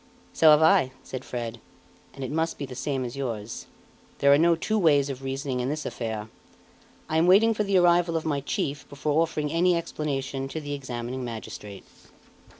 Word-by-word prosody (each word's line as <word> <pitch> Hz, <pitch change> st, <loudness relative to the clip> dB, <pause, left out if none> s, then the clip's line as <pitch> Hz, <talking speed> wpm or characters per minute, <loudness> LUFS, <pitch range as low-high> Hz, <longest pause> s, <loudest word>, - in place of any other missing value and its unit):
"So 160 Hz, -, +6 dB
have 150 Hz, +1 st, +7 dB
I," 130 Hz, -5 st, +4 dB
said 130 Hz, -1 st, -7 dB
Fred, 120 Hz, -1 st, -5 dB, 0.6 s
"and 135 Hz, -, -6 dB
it 130 Hz, -, -4 dB
must 160 Hz, +2 st, -1 dB
be 140 Hz, -, -4 dB
the 130 Hz, -, -9 dB
same 130 Hz, 0 st, -2 dB
as 120 Hz, +1 st, -6 dB
yours. 115 Hz, -5 st, -5 dB, 0.5 s
There 140 Hz, 0 st, +5 dB
are -, -, +6 dB
no 170 Hz, +1 st, +4 dB
two 215 Hz, +6 st, -1 dB
ways 145 Hz, -6 st, +3 dB
of 135 Hz, -1 st, -8 dB
reasoning 135 Hz, -1 st, -3 dB
in 125 Hz, +1 st, -1 dB
this 155 Hz, +1 st, -3 dB
affair. 110 Hz, -2 st, -4 dB, 0.8 s
I 160 Hz, -, 0 dB
am 165 Hz, +2 st, +3 dB
waiting 215 Hz, +5 st, +6 dB
for 210 Hz, -, 0 dB
the 200 Hz, -2 st, +2 dB
arrival 175 Hz, -1 st, +4 dB
of 160 Hz, -, -4 dB
my 145 Hz, -3 st, 0 dB
chief 140 Hz, +1 st, -3 dB
before 150 Hz, +2 st, 0 dB
offering 150 Hz, -3 st, -1 dB
any 175 Hz, +2 st, +3 dB
explanation 140 Hz, -5 st, -3 dB
to 160 Hz, -, -5 dB
the 145 Hz, -1 st, -5 dB
examining 130 Hz, -2 st, -5 dB
magistrate." 110 Hz, -4 st, -8 dB
140 Hz, 190 wpm, -26 LUFS, 130-160 Hz, 0.8 s, have